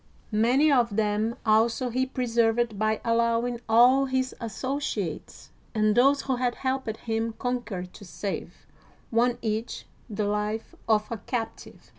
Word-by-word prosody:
Many 250 +8 +4
of 235 -6 +2
them 215 +2 0
also 230 +3 +2
he 260 +2 0
preserved 235 -3 +1
by 215 0 +1
allowing 235 +1 +1
all 250 +4 +6
his 260 -1 -1
associates 235 - -4 0.2
and 215 -1 +3
those 275 +5 +4
who 265 -2 -1
had 245 -1 0
helped 260 -4 -2
him 225 0 -2
con 250 0 -1
quer 190 -6 -5
to 210 - -12
save, 195 +2 -6 0.5
one 240 +1 +2
each, 220 +1 -3 0.2
the 210 -1 -2
life 210 +2 -2 0.2
of 215 -1 +3
a 230 - -2
captive. 225 +1 -6
230 Hz, 140 wpm, -26 LUFS, 215-250 Hz, 0.5 s, all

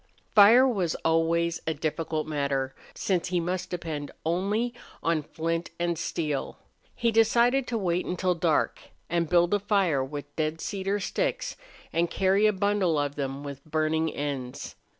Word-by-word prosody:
Fire 230 +5 +8
was 190 -10 0
always 165 +1 +2
a 160 - 0
difficult 155 0 -2
matter, 140 -3 -1 0.2
since 185 -3 0
he 180 0 0
must 180 +2 -2
depend 160 -5 -4 0.2
only 200 +8 0 0.3
on 165 -2 +2
flint 165 +3 -3
and 170 0 0
steel. 155 -3 -3 0.4
He 235 -1 +1
decided 235 +4 +3
to 235 - -1
wait 180 -3 0
till 180 0 +2
dark, 165 -2 +1 0.5
build 175 +2 +4
a 205 - +3
fire 195 -9 +2
with 145 +1 -7
dead 155 0 -1
cedar 195 +3 -2
sticks, - - -2 0.4
and 170 +1 +1
carry 195 +2 +3
a - - +4
bundle 200 -4 +1
of 145 -1 0
them 140 -1 -4
with 140 -1 -7
burning 160 +1 0
ends. 135 -4 -4
170 Hz, 150 wpm, -27 LUFS, 155-195 Hz, 0.5 s, Fire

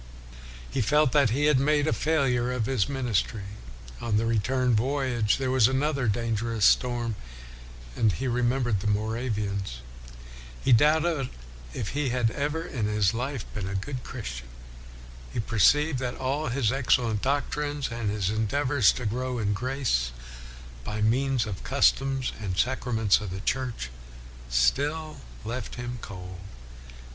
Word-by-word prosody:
He 135 - -2
felt 150 +4 +3
that 140 -4 +4
he 140 +6 +1
had 150 -3 +4
made 145 +1 +2
a - - +2
failure 130 -6 +1
of 125 -3 -1
his 130 -2 0
ministry. 120 -6 -1 0.6
On 110 -3 0
the 110 - +1
return 125 +3 +1
voyage 125 -2 +1
there 130 -1 -1
was 130 -4 +5
another 135 -1 0
dangerous 115 0 0
storm, 120 -3 +2 0.8
and 110 - +3
he 130 - -3
remembered 120 -2 +1
the 105 - -3
Moravians. 105 - -2 0.8
He - - +2
doubted 150 +2 +4 0.5
if 105 - -3
he 145 -1 -1
had 120 -2 +1
ever 150 +4 -2
in 110 -6 -2
his 105 -1 +2
life 125 0 -3
been 100 -4 -4
a 100 - -4
good 125 +6 -4
Christian. - - -6 0.8
He - - -3
perceived 130 - +3
that 125 -1 -3
all 135 +3 -1
his 115 -2 +1
excellent 120 -5 +1
doctrines, 145 +1 -1
and 115 -2 -2
his 100 -2 0
endeavors 125 +3 +2
to 125 - -5
grow 125 +3 -2
in 105 -3 0
grace 115 - 0 0.7
by 105 +9 -3
means 130 +1 +2
of 105 -4 -4
the - - -10
customs 135 -1 +2
and 95 -3 -3
sacraments 115 -4 +2
of 105 - -5
the 95 +1 -5
Church, 125 - -2 0.6
still 145 - +1 0.3
left 120 +1 -4
him 120 0 -5
cold. 90 -1 -8
120 Hz, 145 wpm, -27 LUFS, 105-135 Hz, 0.8 s, was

